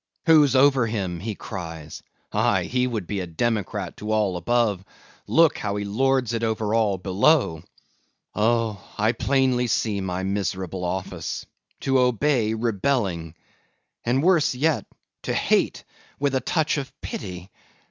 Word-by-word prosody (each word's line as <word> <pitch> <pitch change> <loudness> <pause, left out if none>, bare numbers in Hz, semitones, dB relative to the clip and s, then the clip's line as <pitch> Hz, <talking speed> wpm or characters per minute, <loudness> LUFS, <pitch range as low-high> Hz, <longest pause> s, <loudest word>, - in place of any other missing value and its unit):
Who's 150 -5 +6
over 135 -3 +5
him, 95 -6 -3
he 110 +3 -4
cries;—aye, 80 -7 -3
he 125 0 0
would 110 -7 -3
be 100 +3 -3
a 90 - -4
democrat 105 +4 -2
to 105 +1 -4
all 105 -4 +1
above; 105 +1 +1 0.4
look, 165 -1 +4
how 100 -1 -2
he 105 0 -3
lords 130 +3 +1
it 115 - -1
over 110 -2 -1
all 110 -4 +2
below! 95 - +2 0.7
Oh! 110 -1 +1 0.2
I 110 +2 +3
plainly 130 0 +1
see 105 -2 0
my 95 0 -3
miserable 95 -2 -2
office,—to 95 +8 -3
obey, 125 -2 +2
rebelling; 100 - -1 0.7
and 130 +4 +1
worse 170 -7 +3
yet, 140 -5 +1 0.3
to - - -2
hate - - +1 0.4
with 140 -1 +1
touch 155 -2 +1
of 135 -1 -6
pity! 90 -1 -6
110 Hz, 130 wpm, -24 LUFS, 95-130 Hz, 0.7 s, Who's